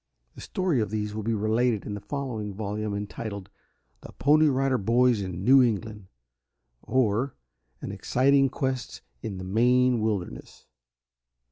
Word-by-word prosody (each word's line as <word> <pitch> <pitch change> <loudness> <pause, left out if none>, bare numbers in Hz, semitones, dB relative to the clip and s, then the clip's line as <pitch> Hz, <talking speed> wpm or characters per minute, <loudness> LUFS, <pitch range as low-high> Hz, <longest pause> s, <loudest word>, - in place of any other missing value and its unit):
The - - -12
story 180 -10 0
of 105 - -2
these 105 0 -3
will 110 - -4
be 115 +2 -1
related 110 +1 +1
in 105 - -4
a - - -5
following 110 -6 -5
volume 105 0 -3
entitled, 100 -1 -6 0.5
"THE - - -11
PONY 155 +2 +4
RIDER 135 -1 +1
BOYS 120 +2 +3
IN 95 -1 -5
NEW 135 +2 +7
ENGLAND; 105 -4 -1 0.7
Or, 125 +1 0 0.5
An - - -5
Exciting 135 +2 +2
Quest 130 -1 -4 0.2
in 100 -3 -5
the 95 - -6
Maine 125 +5 +3
Wilderness." 105 -5 -4
110 Hz, 140 wpm, -26 LUFS, 105-130 Hz, 0.7 s, NEW